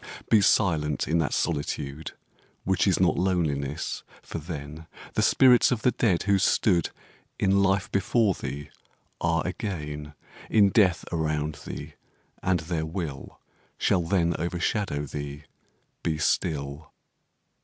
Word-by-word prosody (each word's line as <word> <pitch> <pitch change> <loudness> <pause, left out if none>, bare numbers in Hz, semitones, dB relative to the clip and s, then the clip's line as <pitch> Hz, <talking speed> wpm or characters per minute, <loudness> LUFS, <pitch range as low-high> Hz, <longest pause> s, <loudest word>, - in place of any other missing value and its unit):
Be 110 -2 +6
silent 80 -8 +2
in 85 +2 +2
that 80 - 0
solitude 75 -1 -2 0.5
Which 95 +1 +1
is 95 - +3
not 90 -1 +3
loneliness 80 -6 -1 0.2
for - - -6
then 75 -1 -7 0.3
The - - +1
spirits 125 -2 +6
of 120 -3 -1
the 125 - +4
dead 95 -9 +1
who 100 -1 +3
stood 90 -3 +2 0.5
In 100 0 +3
life 95 0 +1
before 100 +1 +2
thee 70 -3 -6 0.5
are 80 -1 +1
again 75 -6 -5 0.3
In 105 -3 +5
death 95 -5 +3
around 75 -2 -1
thee - - -7 0.5
and 90 -3 +1
their 80 -1 -2
will 80 -6 -6 0.4
Shall 90 -2 +1 0.3
overshadow 85 -2 -1
thee: 70 0 -6 0.6
be 80 -2 -1
still. 75 -1 -1
85 Hz, 120 wpm, -26 LUFS, 75-95 Hz, 0.6 s, Be